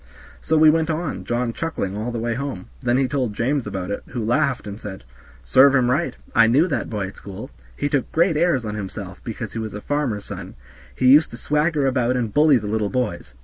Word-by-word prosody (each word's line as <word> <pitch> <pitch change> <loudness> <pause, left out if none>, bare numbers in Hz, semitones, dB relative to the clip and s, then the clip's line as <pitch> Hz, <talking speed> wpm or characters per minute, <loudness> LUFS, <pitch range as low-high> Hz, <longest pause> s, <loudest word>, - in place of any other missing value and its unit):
So 160 - +1
we 155 0 +7
went 160 0 +1
on, 160 -1 -3
John 120 0 -1
chuckling 115 - -3
all 110 +3 -3
the 120 - -4
way 115 +1 -1
home; 125 - -5
then 120 +1 +2
he 135 -1 +2
told 125 -6 -2
James 135 +4 0
about 95 -1 -4
it, 100 - -3
who 115 -4 -4
laughed 130 +3 +1
and 105 +1 -7
said, 95 -8 -8 0.4
"Serve 135 +1 +6
him 125 -2 +3
right. 160 +7 0 0.2
I 115 -2 +6
knew 140 +10 +4
that - - -2
boy 105 -4 -2
at - - -15
school; 100 -3 -9 0.3
he - - 0
took 145 -2 -1
great 170 +1 +3
airs 155 -6 +2
on 105 - -3
himself 100 -2 -7
because 110 -1 -6
he 115 - -3
was 110 -2 -5
a - - -4
farmer's 135 -8 -2
son; - - -8 0.4
he 130 - -1
used 145 +5 +7
to 115 - -9
swagger 150 +2 +1
about 125 -2 +1
and 115 -4 -2
bully 150 -2 +5
the 105 - -5
little 105 0 -1
boys. 125 - -3
125 Hz, 230 wpm, -22 LUFS, 110-145 Hz, 0.4 s, we